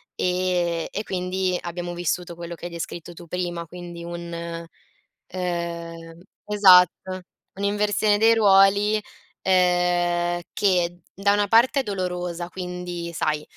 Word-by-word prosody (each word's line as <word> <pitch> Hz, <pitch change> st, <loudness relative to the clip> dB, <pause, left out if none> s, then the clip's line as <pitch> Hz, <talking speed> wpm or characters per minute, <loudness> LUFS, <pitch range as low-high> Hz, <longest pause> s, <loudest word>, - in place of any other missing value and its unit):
ehm, 180 Hz, -2 st, 0 dB
e 210 Hz, -, -3 dB
quindi 185 Hz, 0 st, -1 dB
abbiamo 175 Hz, 0 st, -5 dB
vissuto 175 Hz, 0 st, -2 dB
quello 170 Hz, 0 st, -7 dB
che 170 Hz, -, -10 dB
hai 175 Hz, -, -5 dB
descritto 170 Hz, 0 st, -6 dB
tu 175 Hz, +1 st, -12 dB
prima, 175 Hz, -1 st, -3 dB
quindi 175 Hz, 0 st, -9 dB
un, 170 Hz, -1 st, -6 dB, 0.7 s
ehm 170 Hz, -2 st, -4 dB, 0.3 s
esatto 185 Hz, -2 st, +5 dB, 0.3 s
un'inversione 205 Hz, +1 st, +1 dB
dei 225 Hz, +1 st, +5 dB
ruoli, 205 Hz, 0 st, +5 dB, 0.4 s
ehm, 175 Hz, -1 st, +2 dB
che 175 Hz, -3 st, +1 dB
da 200 Hz, +1 st, +2 dB
una 205 Hz, 0 st, +2 dB
parte 235 Hz, +6 st, +4 dB
è -, -, -8 dB
dolorosa: 180 Hz, -4 st, -3 dB
quindi 180 Hz, -1 st, -5 dB
sai 150 Hz, -2 st, -1 dB
180 Hz, 120 wpm, -24 LUFS, 170-190 Hz, 0.7 s, esatto